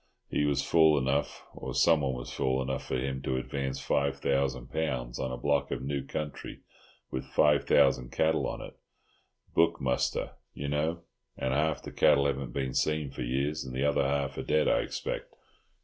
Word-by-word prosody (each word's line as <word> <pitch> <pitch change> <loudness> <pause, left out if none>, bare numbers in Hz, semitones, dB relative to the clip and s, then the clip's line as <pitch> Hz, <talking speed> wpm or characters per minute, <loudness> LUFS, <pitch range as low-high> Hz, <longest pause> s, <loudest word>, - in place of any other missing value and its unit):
He 75 - +1
was 70 -1 +1
fool 80 -2 +5
enough, 70 +2 -1
or - - -6
someone 75 -6 +3
was - - -7
fool 65 0 0
enough 65 0 -3
for 65 - -1
him, 65 +1 -2
to 65 -1 -1
advance 65 +1 -3
five 70 +1 0
thousand 65 -2 -1
pounds 65 -7 -2
on 65 - -2
a 65 - -4
block 70 0 +1
of - - -3
new 70 0 -2
country 75 +1 -6 0.5
with 65 - -3
five 75 -1 +3
thousand 65 -3 +3
cattle 80 0 +1
on - - -5
it—book 85 0 -3
muster, 65 -1 0 0.2
you 70 - -4
know, 80 +4 -1 0.3
and 65 - -1
half 75 +2 +1
the - - -7
cattle 70 -1 +4
haven't 70 -3 -1
been 65 0 -2
seen 75 -2 0
for - - -7
years, 70 +5 -1
and 65 -1 -7
the 65 +2 0
other 75 - +2
half 70 0 -1
are - - -1
dead, 75 0 +2
I - - +4
expect. - - -4
70 Hz, 180 wpm, -29 LUFS, 65-75 Hz, 0.5 s, fool